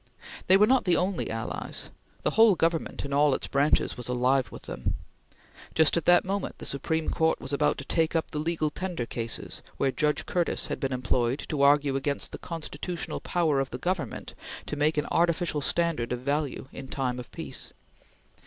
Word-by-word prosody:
These 190 - +7
were 210 - +6
not 260 +3 +3
the 180 -2 +4
only 185 0 0
allies; 115 0 -4 0.3
the - - +2
whole 225 -3 +6
government 165 -3 0
in 140 - -4
all 145 -1 +4
its - - -3
branches 140 +2 +2
was 125 - -5
alive 125 +1 +2
with - - -10
them. 65 - -3 0.8
Just 160 -2 +5
at 170 - 0
that 175 +1 +6
moment 195 +1 -2
the - - -8
Supreme 160 +4 -1
Court 160 0 +2
was 135 +2 -5
about 150 +1 +2
to 140 - -7
take 165 +1 +1
up 165 - 0
the 150 - -2
Legal 155 -1 0
Tender 180 -7 -3
cases 115 -1 -5 0.2
where 135 - +2
Judge 150 +2 0
Curtis 175 -2 0
had - - -4
been 135 -3 -1
employed 125 +1 0
to 150 -3 -1
argue 140 -1 +5
against 140 +1 -1
the - - -7
constitutional 165 +1 -4
power 160 -5 +1
of 135 -1 -1
the 125 - -5
Government 180 +6 -3 0.3
to - - -3
make 150 +1 +1
an 150 - +1
artificial 170 -2 +2
standard 165 -6 0
of 125 0 -2
value 140 0 -1
in 135 - -7
time 125 -2 -2
of 125 - -9
peace. - - -5
150 Hz, 190 wpm, -28 LUFS, 135-170 Hz, 0.8 s, These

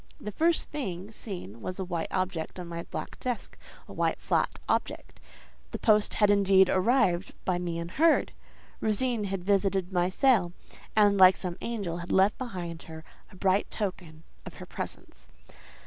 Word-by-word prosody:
The 210 - -6
first 330 - +2
thing 200 -9 -5
seen 175 - -7
was 185 - -5
a 190 - -3
white 170 -2 -3
object 185 -2 -3
on 180 - -5
my 170 0 -5
black - - -6
desk, 250 -2 -4 0.3
a - - -10
white, - - 0
flat - - 0
object. - - -2 0.5
The - - -5
post 210 -2 +3
had, 210 -1 +4
indeed, 195 -2 +5
arrived; 190 -3 +2
by 180 -1 +1
me 175 -2 -3
unheard. 225 - +2 0.5
Rosine 220 0 0
had 195 -2 -3
visited 195 -1 +1
my 175 0 +2
cell, 190 -5 +3 0.4
and, 205 -2 +4
like 185 0 +8
some 180 -2 -4
angel, 200 -8 -3
had 175 0 -6
left 195 +2 +3
behind 180 -9 -5
her 160 0 -9 0.3
a - - -14
bright 190 +1 +1
token 175 -6 -5 0.2
of - - -10
her - - -9
presence. - - -8
190 Hz, 165 wpm, -28 LUFS, 175-210 Hz, 0.5 s, like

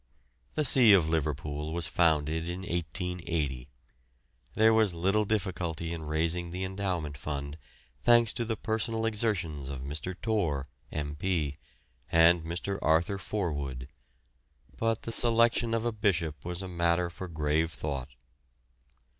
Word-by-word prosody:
The 155 - +1
see 125 -5 +7
of 85 -5 +4
Liverpool 75 0 -2
was 85 -2 -2
founded 80 0 +2
in 90 +2 -4
1880. 85 -6 -3 0.9
There 110 +1 +5
was 110 -5 +3
little 95 +5 +2
difficulty 90 -6 -2
in 80 -2 -6
raising 85 +3 0
the 90 +2 -4
endowment 95 -6 -2
fund, 70 -1 -4 0.5
thanks 120 -2 +5
to 120 - -2
the 110 -1 -2
personal 110 0 -1
exertions 95 - -1
of 70 -2 -5
Mr. 75 +7 -4
Torr, 85 -12 0 0.2
M.P., 75 0 -2 0.5
and 85 +1 +6
Mr. 90 +4 -3
Arthur 85 +5 +2
Forwood, 70 -11 -3 0.9
but 115 -1 0
the 115 - -4
selection 115 0 +3
of 115 0 -1
a 120 - +1
bishop 85 - 0
was 90 +2 -4
a - - -5
matter 85 0 +1
for 95 +2 -7
grave 80 0 0
thought. 70 -2 -4
85 Hz, 130 wpm, -29 LUFS, 75-100 Hz, 0.9 s, see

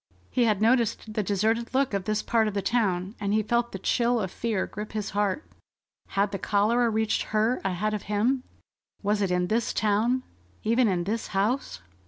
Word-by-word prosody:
He 245 -2 +3
had 215 -2 +2
noticed 225 -2 +2
the 215 - 0
deserted 220 +5 0
look 270 -3 +2
of 195 -2 -1
this 215 0 0
part 225 -2 +2
of 210 - -3
the 200 - -1
town, 195 -4 0
and 205 0 0
he 215 - +2
felt 235 +2 0
the - - -4
chill 235 +5 +1
of 190 -4 -3
fear 220 -4 -1
grip 210 +1 -7
his 215 -2 -3
heart. 205 +6 0 0.7
Had 200 +1 +3
the 195 - -3
cholera 230 +4 +2
reached 220 0 +1 0.2
her 225 +4 +2
ahead 195 +3 -1
of 210 - -2
him? 235 +6 +2 0.6
Was 205 +1 +1
it 195 - +1
in 180 0 +1
this 220 +5 0
town? 225 +5 +2 0.4
Even 230 +2 +3
in 180 -3 +1
this 215 +5 -2
house? 205 - 0
215 Hz, 195 wpm, -27 LUFS, 200-235 Hz, 0.7 s, He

